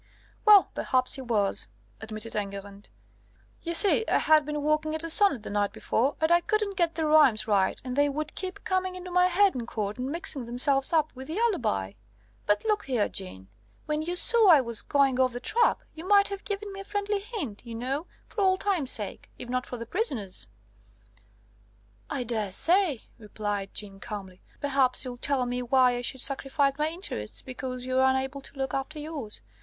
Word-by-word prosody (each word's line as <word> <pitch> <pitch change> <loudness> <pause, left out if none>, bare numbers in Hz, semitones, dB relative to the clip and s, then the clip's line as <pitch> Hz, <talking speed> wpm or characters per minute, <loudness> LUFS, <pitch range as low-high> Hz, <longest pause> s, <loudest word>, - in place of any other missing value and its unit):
"Well, 410 -7 +7
perhaps 255 -1 0
he 270 - -5
was," 215 -6 0 0.3
admitted 220 +1 -4
Enguerrand. 200 0 -6 0.7
"You 340 0 -1
see, 410 +5 +4
I - - +3
had 310 -2 +4
been 300 -1 -3
working 305 +1 0
at 315 - -3
a 330 - 0
sonnet 330 - +4
the - - -7
night 205 0 0
before, 265 +5 -1
and 315 +1 +1
I 345 0 +5
couldn't 425 0 -1
get 340 -3 +1
the 320 -1 -1
rhymes 295 -8 +4
right, 200 -3 +1
and 250 -1 -4
they 285 +1 +3
would 305 +2 -4
keep 375 -1 -6
coming 370 -1 -1
into 365 0 -8
my 360 0 +4
head 385 +2 +3
in 240 -2 -5
court 210 +1 -4
and 255 +2 -3
mixing 300 -6 -3
themselves 270 +3 +3
up 310 -2 +2
with 260 +1 -10
the 320 +5 -4
alibi. 240 - 0 0.5
But 205 - +1
look 425 -1 0
here, 245 -6 +1
Jeanne, 95 - -7 0.4
when 300 0 -1
you 345 +3 -3
saw 450 +4 +5
I 320 -4 +8
was 235 -4 -2
going 275 -2 +2
off 255 -1 +2
the 245 - -4
track, 465 - +1
you 320 - -9
might 400 +2 +4
have 400 -1 -6
given 405 0 -4
me 390 - -8
a - - -6
friendly 410 0 -2
hint, 390 - -6
you 235 -2 -8
know 270 +8 -3 0.2
for 420 - -5
old 375 -1 +3
times' 360 -10 0
sake, 210 -6 -2
if 245 - -9
not 255 0 -2
for 245 - -6
the 230 - -6
prisoner's!" 225 - -2 1.6
"I 255 - -2
daresay," 245 - +3 0.2
replied 205 -2 -4
Jeanne 195 -2 -4
calmly: 195 -4 -8 0.2
"perhaps 270 -2 +1
you'll 245 -1 -6
tell 265 0 0
me 245 0 -2
why 250 0 +4
I 245 - -3
should 255 +1 -1
sacrifice 275 +1 0
my 305 +1 +2
interests 320 - -4
because 255 -1 -6
you're 260 0 +1
unable 265 +1 +1
to 275 - -10
look 265 -1 -3
after 275 +3 -3
yours. 295 - -6
270 Hz, 195 wpm, -27 LUFS, 235-345 Hz, 1.6 s, I